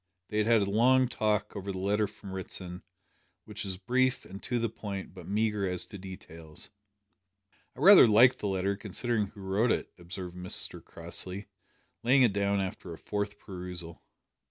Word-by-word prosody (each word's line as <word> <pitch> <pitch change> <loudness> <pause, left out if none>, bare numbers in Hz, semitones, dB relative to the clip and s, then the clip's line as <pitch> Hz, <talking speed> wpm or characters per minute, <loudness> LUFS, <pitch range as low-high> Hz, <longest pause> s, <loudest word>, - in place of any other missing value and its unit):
They 105 - -1
had 105 - +2
had 115 -2 +5
a 100 - -2
long 130 +4 +4
talk 105 -3 -1
over 100 0 -4
the 95 - -5
letter 100 +3 +1
from 100 - -11
Ritson, 90 -1 -6 0.6
which - - -6
was 95 -2 -4
brief 130 +6 +1
and 95 +1 -10
to 125 - -1
the 115 0 +1
point 100 -3 -6
but 90 -3 -11
meagre 105 -1 0
as 90 -1 -2
to 100 - -10
details. 85 -4 -10 1.0
"I - - -10
rather 195 -9 +9
like 120 +4 +6
the 105 - -2
letter, 95 +1 0
considering 105 +2 -1
who 100 - -13
wrote 100 +5 +1
it," - - -2
observed 90 0 -7
Mr 90 0 -3
Crossley, 90 +3 -4 0.5
laying 130 +3 +5
it 115 -5 +4
down 100 0 +1
after 95 -2 -4
a 80 - -7
fourth 105 +2 -3
perusal. 90 -4 -7
100 Hz, 175 wpm, -30 LUFS, 95-110 Hz, 1.0 s, rather